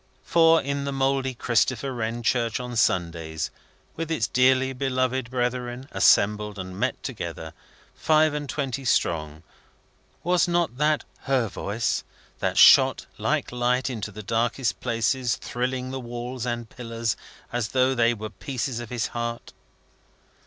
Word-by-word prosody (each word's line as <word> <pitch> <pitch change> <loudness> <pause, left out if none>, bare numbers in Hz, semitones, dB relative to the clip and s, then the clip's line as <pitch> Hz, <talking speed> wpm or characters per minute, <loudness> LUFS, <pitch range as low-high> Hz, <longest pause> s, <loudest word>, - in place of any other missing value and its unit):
For, 165 -1 +5
in 140 0 -2
the 140 - -2
mouldy 135 -1 0
Christopher 125 +3 +1
Wren 120 0 -3
church 115 0 +1
on 125 -1 -5
Sundays, 85 -6 0 0.4
with 165 0 -4
its 165 - +1
dearly 130 +1 +3
beloved 130 -1 -1
brethren 125 0 -2
assembled 105 +2 +3
and 95 0 -7
met - - -1
together, 80 0 -5 0.4
five 155 -1 +3
and 145 -2 -4
twenty 135 -1 -3
strong, 80 - 0 0.8
was 175 0 +3
not 170 -7 0
that 150 0 +2 0.2
Her 130 -4 +2
voice 105 +4 -2 0.4
that - - -1
shot - - +7
like - - 0
light 125 +2 +1
into 110 -4 -4
the 105 +1 -9
darkest 115 -1 0
places, 120 +1 0
thrilling 125 +1 -3
the 135 - -4
walls 120 0 -5
and 120 -1 -3
pillars 115 -1 -3 0.4
as 120 -3 0
though 130 +2 +2
they 120 -1 +3
were 110 -1 -6
pieces 125 +3 -4
of 120 -2 -7
his 120 -3 -1
heart! 120 0 -4
125 Hz, 140 wpm, -25 LUFS, 115-130 Hz, 0.8 s, shot